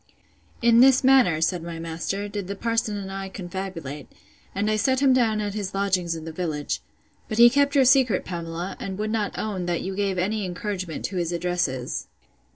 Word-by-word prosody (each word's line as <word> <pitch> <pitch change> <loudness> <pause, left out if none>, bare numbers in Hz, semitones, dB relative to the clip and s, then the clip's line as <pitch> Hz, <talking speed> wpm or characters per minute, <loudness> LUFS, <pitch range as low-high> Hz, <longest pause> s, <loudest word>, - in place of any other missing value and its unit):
In 235 0 +6
this 265 +1 +6
manner, 255 -12 +5
said 175 +1 +1
my 170 0 -6
master, 165 +5 -3
did 205 -2 -5
the 200 - -4
parson 225 -1 -1
and 195 -1 -6
I 195 0 -5
confabulate; 175 -7 -6 0.5
and 200 +2 0
I 215 - +2
set 260 +5 +2
him 270 -2 +4
down 225 -4 +2
at 205 -1 -3
his 200 -2 -4
lodgings 185 -4 0
in 160 -1 -7
the 165 - -5
village. 155 -3 -3 0.5
But 215 - -3
he 240 0 +8
kept 280 +2 +2
your 270 -2 +5
secret, 255 -6 +4
Pamela; 170 +1 -5
and 190 -1 -5
would 215 +1 -2
not 215 -2 -2
own, 190 -5 -3
that 175 -1 -1
you 190 +1 -4
gave 195 -2 -1
any 205 +4 0
encouragement 185 -2 -4
to 190 - -4
his 170 -1 -1
addresses. 170 -7 -2
195 Hz, 195 wpm, -24 LUFS, 175-215 Hz, 0.5 s, he